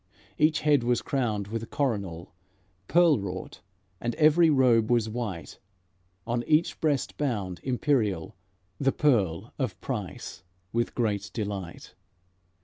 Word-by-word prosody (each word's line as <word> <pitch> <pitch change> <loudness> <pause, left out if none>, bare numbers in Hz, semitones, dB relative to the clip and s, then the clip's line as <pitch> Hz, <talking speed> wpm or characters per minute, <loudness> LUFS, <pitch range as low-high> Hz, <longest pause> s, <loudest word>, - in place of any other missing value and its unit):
Each 155 +1 +3
head 145 -3 +4
was 120 0 +1
crowned 110 -7 -1
with 115 +1 -4
coronal, 100 - -2 0.5
Pearl 170 -5 +5
wrought, 95 -1 -6 0.4
and 120 -1 -2
every 155 +2 +5
robe 125 -6 +4
was 120 -2 +3
white; 110 -7 -5 0.7
On 120 0 -1
each 155 +2 +2
breast 145 -5 0
bound, 105 -11 -2
imperial, 120 - 0 0.5
The 135 -1 +2
Pearl 100 - +1
of - - -2
Price - - -5 0.3
with 120 0 -1
great 105 -4 -1
delight. 100 -5 -5
120 Hz, 120 wpm, -27 LUFS, 100-140 Hz, 0.7 s, Pearl